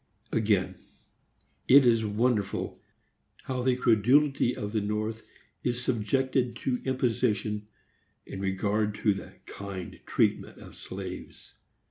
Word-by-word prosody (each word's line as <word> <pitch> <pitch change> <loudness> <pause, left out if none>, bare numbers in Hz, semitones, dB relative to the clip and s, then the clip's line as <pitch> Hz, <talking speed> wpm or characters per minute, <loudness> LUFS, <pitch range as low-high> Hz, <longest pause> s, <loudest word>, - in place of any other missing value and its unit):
Again: 100 -4 +1 0.9
it 135 0 +8
is 115 -2 +4
wonderful 105 -1 -1 0.6
how 130 -1 -3
the 130 0 +2
credulity 125 +3 +3
of 105 0 -4
the 110 -1 0
North 110 +2 -2 0.4
is 125 0 -1
subjected 125 +1 0
to 125 0 -2
imposition 115 -5 0 0.6
in 95 - -7
regard 105 +2 0
to 105 -1 +2
the 95 - -8
kind 100 -3 -7
treatment - - +1
of - - -13
slaves. 95 -1 -8
110 Hz, 110 wpm, -28 LUFS, 105-125 Hz, 0.9 s, it